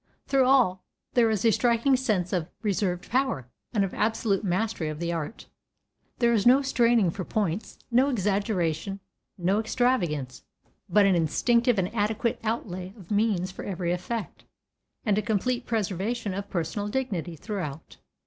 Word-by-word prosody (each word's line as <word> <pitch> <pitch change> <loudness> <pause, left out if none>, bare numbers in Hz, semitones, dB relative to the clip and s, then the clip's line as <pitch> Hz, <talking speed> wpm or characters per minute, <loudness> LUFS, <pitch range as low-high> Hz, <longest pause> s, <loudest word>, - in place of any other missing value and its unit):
Through 270 -1 +3
all 245 -9 +3 0.3
there 235 -2 +4
is 215 -1 0
a 225 - +6
striking 240 +4 +3
sense 210 -9 0
of 175 -2 -1
reserved 190 -3 -1
power, 250 - 0 0.2
and 210 -4 +2
of 190 - -6
absolute 220 -2 0
mastery 185 -3 -1
of 155 0 -6
the 170 0 -1
art. 165 +5 -5 0.7
There 235 -1 +3
is 215 -4 +2
no 265 +3 +6
straining 235 -8 +3
for 190 +2 -5
points, 200 0 -2
no 255 +4 +4
exaggeration, 195 - -1 0.4
no 190 +3 +1
extravagance, 190 - 0 0.5
but 210 -1 +5
an 195 - +4
instinctive 235 - +2
and 190 +1 -1
adequate 220 +1 0
outlay 190 -4 -3
of 190 -3 -13
means 205 -3 +1
for - - -8
every 180 -3 -2
effect, 190 +4 -4 0.6
and 210 -2 +3
a - - 0
complete 235 +4 -1
preservation 210 0 -1
of 200 +1 -5
personal 180 +4 -2
dignity 205 -9 -2
throughout. 165 -5 -6
205 Hz, 150 wpm, -27 LUFS, 180-235 Hz, 0.7 s, a